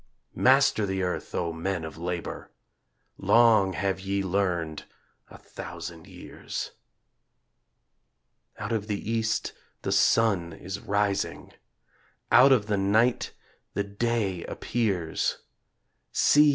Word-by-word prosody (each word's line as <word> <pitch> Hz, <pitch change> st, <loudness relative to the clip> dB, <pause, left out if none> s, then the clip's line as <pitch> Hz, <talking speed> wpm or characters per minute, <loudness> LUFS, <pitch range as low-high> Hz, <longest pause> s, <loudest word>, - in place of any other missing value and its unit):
Master 135 Hz, -5 st, +4 dB
the 95 Hz, -1 st, -1 dB
earth, 90 Hz, -, -3 dB
O 85 Hz, -2 st, -1 dB
men 85 Hz, +1 st, -2 dB
of 80 Hz, -, -8 dB
labor; 85 Hz, +1 st, -5 dB, 0.7 s
Long 110 Hz, -5 st, +5 dB
have 95 Hz, 0 st, -1 dB
ye 100 Hz, +1 st, -1 dB
learned 90 Hz, -5 st, -1 dB, 0.4 s
a -, -, -12 dB
thousand 85 Hz, +2 st, -9 dB
years. 90 Hz, -2 st, -7 dB, 1.9 s
Out 100 Hz, -, -5 dB
of 110 Hz, -2 st, -1 dB
the 105 Hz, -1 st, -3 dB
East 115 Hz, -1 st, 0 dB, 0.3 s
the -, -, -1 dB
sun 95 Hz, -7 st, +3 dB
is 95 Hz, +4 st, -6 dB
rising, 100 Hz, -1 st, -1 dB, 0.8 s
Out 135 Hz, +2 st, +8 dB
of 120 Hz, -6 st, +4 dB
the 105 Hz, -1 st, 0 dB
night 110 Hz, +5 st, +2 dB, 0.4 s
the 100 Hz, -, +1 dB
day 100 Hz, -3 st, -1 dB
appears; 95 Hz, -9 st, -1 dB, 0.7 s
See! 150 Hz, 0 st, +5 dB
100 Hz, 110 wpm, -27 LUFS, 90-110 Hz, 1.9 s, Out